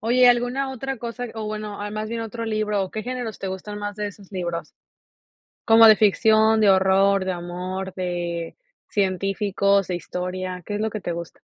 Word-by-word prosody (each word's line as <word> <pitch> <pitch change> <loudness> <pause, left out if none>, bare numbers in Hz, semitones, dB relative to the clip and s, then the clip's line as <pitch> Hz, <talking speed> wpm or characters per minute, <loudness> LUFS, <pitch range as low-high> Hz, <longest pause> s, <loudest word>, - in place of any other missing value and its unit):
Oye, 245 +3 +5
¿alguna 245 +3 +1
otra 270 +1 -4
cosa? 240 +1 -5
O 220 -1 -4
bueno, 210 -1 -5
más 215 0 -3
bien 230 0 -3
otro 230 +1 -5
libro, 215 -2 0
¿o 190 - -5
qué 215 -1 -5
géneros, 245 -4 -4
te - - -5
gustan 190 +2 -5
más, 205 0 -4
de 210 0 -3
esos 200 0 -15
libros? 175 -3 -3 1.0
¿Como 225 -1 +8
de 215 - +9
ficción, 220 +1 +4
de 205 - +6
horror, 190 +1 +4
de 185 - -1
amor, 180 +2 -5
de 175 -2 -3 0.3
científicos, 195 0 +1
de 180 - -3
historia? 180 +1 -4
¿Qué 205 - -4
es 205 - -2
lo 220 0 0
que 215 - -5
te 175 - -3
gusta? 170 0 -7
205 Hz, 185 wpm, -23 LUFS, 185-220 Hz, 1.0 s, de